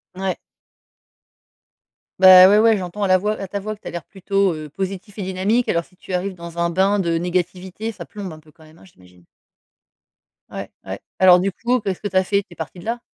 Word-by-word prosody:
Ouais. 190 Hz, 0 st, -2 dB, 1.8 s
Bah, 185 Hz, 0 st, +10 dB
ouais, 205 Hz, +1 st, +5 dB
ouais, 225 Hz, 0 st, +4 dB
j'entends 190 Hz, +2 st, -5 dB
à -, -, +2 dB
la 185 Hz, 0 st, +5 dB
voix 210 Hz, +3 st, -2 dB
à 195 Hz, -, -5 dB
ta 200 Hz, -, -4 dB
voix, 215 Hz, +2 st, -5 dB
que 210 Hz, -, -29 dB
tu -, -, -10 dB
as -, -, -5 dB
l'air 175 Hz, -1 st, -6 dB
plutôt, 195 Hz, -1 st, 0 dB
heu, 155 Hz, -1 st, -8 dB
positif 195 Hz, +5 st, -6 dB
et 205 Hz, -, -4 dB
dynamique. 190 Hz, +6 st, 0 dB
Alors, 170 Hz, 0 st, +1 dB
si -, -, -26 dB
tu 185 Hz, -, -9 dB
arrives 185 Hz, +1 st, -2 dB
dans 170 Hz, -1 st, -9 dB
un 170 Hz, 0 st, +1 dB
bain 190 Hz, +4 st, +2 dB
de 170 Hz, -3 st, 0 dB
négativité, 180 Hz, +4 st, -3 dB
ça 220 Hz, -, -10 dB
plombe 200 Hz, -4 st, -8 dB
un 155 Hz, -, -11 dB
peu 155 Hz, 0 st, -21 dB
quand 160 Hz, -, -21 dB
même, 155 Hz, +1 st, -18 dB
hein, 190 Hz, -, -18 dB
j'imagine. 90 Hz, -, -21 dB, 1.3 s
Ouais, -, -, -7 dB, 0.2 s
ouais. -, -, -6 dB, 0.2 s
Alors, 180 Hz, -1 st, +7 dB
du 195 Hz, +2 st, 0 dB
coup, 245 Hz, +6 st, 0 dB
qu'est-ce 195 Hz, -3 st, -4 dB
que 205 Hz, -, -2 dB
tu -, -, -12 dB
as 185 Hz, -, +4 dB
fait? 200 Hz, +2 st, +1 dB
Tu -, -, -52 dB
es -, -, -17 dB
parti 165 Hz, +2 st, -7 dB
de 175 Hz, -, -12 dB
là? 235 Hz, +1 st, -3 dB
185 Hz, 235 wpm, -21 LUFS, 175-200 Hz, 1.8 s, Bah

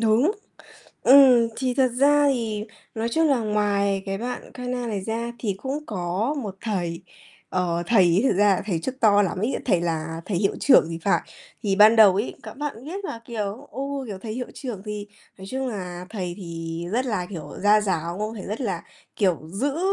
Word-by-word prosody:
Đúng. 225 Hz, -, +3 dB, 0.7 s
Ừm, 255 Hz, -3 st, +7 dB
thì 255 Hz, -1 st, 0 dB
thật 260 Hz, 0 st, +3 dB
ra 290 Hz, +1 st, +5 dB
thì 220 Hz, -4 st, -2 dB, 0.3 s
nói 225 Hz, +1 st, -1 dB
chung 320 Hz, +6 st, +2 dB
là 270 Hz, -4 st, +3 dB
ngoài 205 Hz, -2 st, +1 dB
cái 195 Hz, 0 st, -2 dB
bạn 245 Hz, +3 st, -5 dB
Kana 250 Hz, -1 st, -3 dB
này 210 Hz, -4 st, -2 dB
ra, 230 Hz, +1 st, -2 dB
thì 205 Hz, -5 st, -2 dB
cũng 285 Hz, +3 st, -4 dB
có 195 Hz, -, -1 dB
một 200 Hz, -3 st, -6 dB
thầy. 175 Hz, -6 st, -3 dB, 0.5 s
Ờ, 175 Hz, -2 st, 0 dB
thầy 210 Hz, -4 st, +5 dB
ấy 175 Hz, +2 st, +4 dB
thực -, -, +2 dB
ra 205 Hz, +1 st, +5 dB
là -, -, -4 dB
thầy 175 Hz, -6 st, 0 dB
chức 260 Hz, +9 st, -5 dB
to 205 Hz, -2 st, +5 dB
lắm 185 Hz, -2 st, -1 dB
ấy, 225 Hz, +7 st, 0 dB
thầy 185 Hz, -8 st, +2 dB
là 165 Hz, -1 st, -2 dB
thầy 200 Hz, -, -1 dB
hiệu 195 Hz, +1 st, +1 dB
trưởng 260 Hz, -, +6 dB
thì 165 Hz, -, -4 dB
phải. 200 Hz, -, +3 dB, 0.4 s
Thì 195 Hz, -2 st, +1 dB
ban 215 Hz, +2 st, +7 dB
đầu 210 Hz, -4 st, +8 dB
ấy, 205 Hz, +5 st, -2 dB
các -, -, -8 dB
bạn 275 Hz, -4 st, -5 dB
biết 380 Hz, +7 st, -6 dB
là, 230 Hz, -, -5 dB
kiểu, 225 Hz, +3 st, -4 dB
ừ, -, -, -6 dB, 0.3 s
kiểu, 200 Hz, -4 st, -6 dB
thầy 215 Hz, +2 st, -6 dB
hiệu 250 Hz, +2 st, -4 dB
trưởng 240 Hz, -8 st, -6 dB
thì 210 Hz, -1 st, -5 dB, 0.3 s
nói 190 Hz, -, -9 dB
chung 265 Hz, 0 st, -2 dB
là 180 Hz, -5 st, -6 dB
thầy 185 Hz, -5 st, -4 dB
thì 165 Hz, -2 st, -6 dB
rất 250 Hz, +3 st, +1 dB
là, 205 Hz, -7 st, -1 dB
kiểu, 160 Hz, -6 st, -7 dB
gia 210 Hz, +1 st, +5 dB
giáo 175 Hz, -3 st, -2 dB
không? 215 Hz, +2 st, -3 dB
Thầy 200 Hz, -, -7 dB
rất 210 Hz, +5 st, -4 dB
là, 195 Hz, -9 st, -2 dB, 0.3 s
kiểu, 185 Hz, -6 st, +2 dB
giữ 275 Hz, +9 st, -1 dB
210 Hz, 210 wpm, -24 LUFS, 185-245 Hz, 0.7 s, đầu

